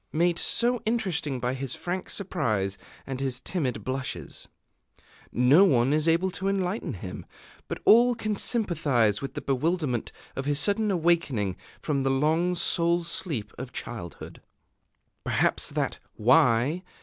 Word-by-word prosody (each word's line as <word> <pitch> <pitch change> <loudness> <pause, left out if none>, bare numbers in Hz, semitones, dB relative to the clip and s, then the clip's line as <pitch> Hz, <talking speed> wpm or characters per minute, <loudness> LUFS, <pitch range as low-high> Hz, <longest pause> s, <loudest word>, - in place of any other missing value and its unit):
made 170 +2 +1
so 240 0 +1
interesting 185 - -1
by 125 +1 -1
his 135 -1 -4
frank 180 +1 -4
surprise 110 - -1 0.3
and 135 -1 -5
his 130 -2 -2
timid 140 -5 -2
blushes. 130 0 -4 0.8
No 130 +9 +5
one 135 -7 +3
is 155 +1 +2
able 170 +3 +2
to 190 +2 -3
enlighten 195 +1 -1
him; - - -7 0.4
but - - -4
all 240 +2 +6
can 215 -2 -2
sympathize 145 - +1
with 135 -1 -6
the - - -4
bewilderment 140 -2 -1 0.2
of 135 - -4
his 145 0 +1
sudden 210 +3 +1
awakening 165 - +1 0.2
from 140 -3 -1
the 135 - +1
long 160 +6 +1
soul 170 0 +2
sleep 155 - -2
of 125 -1 -7
childhood. 95 -9 -7 0.8
Perhaps - - +2
that - - -2 0.2
"Why?" 125 +7 +3
155 Hz, 135 wpm, -27 LUFS, 130-180 Hz, 0.8 s, all